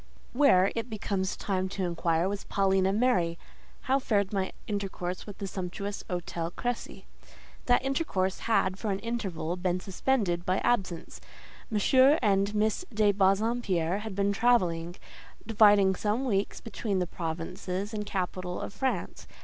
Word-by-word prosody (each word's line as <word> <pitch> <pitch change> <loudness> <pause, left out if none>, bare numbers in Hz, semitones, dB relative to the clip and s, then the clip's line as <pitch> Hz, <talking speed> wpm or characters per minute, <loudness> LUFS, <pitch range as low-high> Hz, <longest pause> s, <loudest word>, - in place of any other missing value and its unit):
Where, 220 -9 +5
it 230 +1 -3
becomes 195 -2 -2
time 190 -2 -1
to 195 0 -3
inquire, 170 0 +1
was 200 0 -4
Paulina 190 -1 +2
Mary? 195 -7 +2 0.4
How 265 +1 +2
fared 205 -6 0
my 190 -1 -1
intercourse 195 -3 -4
with 205 - -8
the 200 - -5
sumptuous 195 +2 -5
Hôtel 175 -1 -3
Crécy? 245 0 -4 0.6
That 245 +1 +3
intercourse 200 - 0
had, 195 -4 +1
for 220 - -2
an 195 - 0
interval, 195 -7 -3
been 180 0 0
suspended 195 -2 0
by 185 +1 +1
absence; 190 -8 -1 0.5
M. 260 +7 +5
and 200 0 +2
Miss 215 - +1
de 210 -2 +3
Bassompierre 195 -2 +1
had 215 -2 -6
been 200 +1 +1
travelling, 180 -7 +2 0.5
dividing 205 -3 +5
some 215 +7 -1
weeks 200 -5 -1
between 215 -2 -3
the 180 - +1
provinces 180 +4 -4
and 210 -1 -2
capital 185 -2 -3
of - - -6
France. 260 +6 -3
195 Hz, 140 wpm, -29 LUFS, 185-220 Hz, 0.6 s, Where